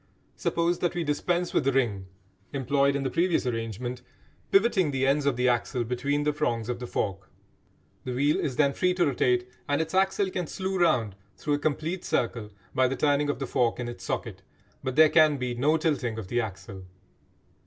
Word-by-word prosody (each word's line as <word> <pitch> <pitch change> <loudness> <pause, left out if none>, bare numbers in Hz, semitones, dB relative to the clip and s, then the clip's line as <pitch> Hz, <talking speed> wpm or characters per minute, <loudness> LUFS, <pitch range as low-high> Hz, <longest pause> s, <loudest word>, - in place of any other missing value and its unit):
Suppose 170 +1 0
that 175 -1 -1
we 175 - -1
dispense 175 +4 -1
with - - +2
the 135 - +2
ring 110 -8 0 0.5
employed 140 +1 +2
in 140 - -1
the 130 - -2
previous 175 -3 +1
arrangement, 120 +1 -3 0.5
pivoting 195 -5 +3
the 135 -1 0
ends 140 +1 +2
of 140 - +2
the 125 +1 +1
axle 120 0 0
between 130 +5 -1
the 150 0 +1
prongs 115 -5 -1
of 120 -1 -2
the 125 - -6
fork. 95 -4 -3 0.7
The 125 -1 -4
wheel 145 +3 +2
is 130 - -2
then 140 -1 +3
free 180 +3 +1
to 180 - +3
rotate, 125 -3 +1 0.2
and 145 - +2
its 160 +1 -2
axle 190 +1 +2
can 180 -3 -3
slew 190 +2 -3
round 115 - +2 0.2
through 145 - -1
a 145 - +1
complete 155 +4 -2
circle 115 -3 -1 0.2
by 130 -1 +3
the 135 - -2
turning 145 0 +2
of 145 - -1
the 135 - -3
fork 120 -2 0
in 120 - -3
its 120 -6 -8
socket, - - -4 0.4
but 130 -1 -3
there 155 +1 +8
can 155 -2 +4
be 125 -2 -2
no 145 +6 +2
tilting 130 -9 -1
of 100 -4 -6
the 120 0 +1
axle. 95 -3 -7
135 Hz, 200 wpm, -27 LUFS, 120-155 Hz, 0.7 s, there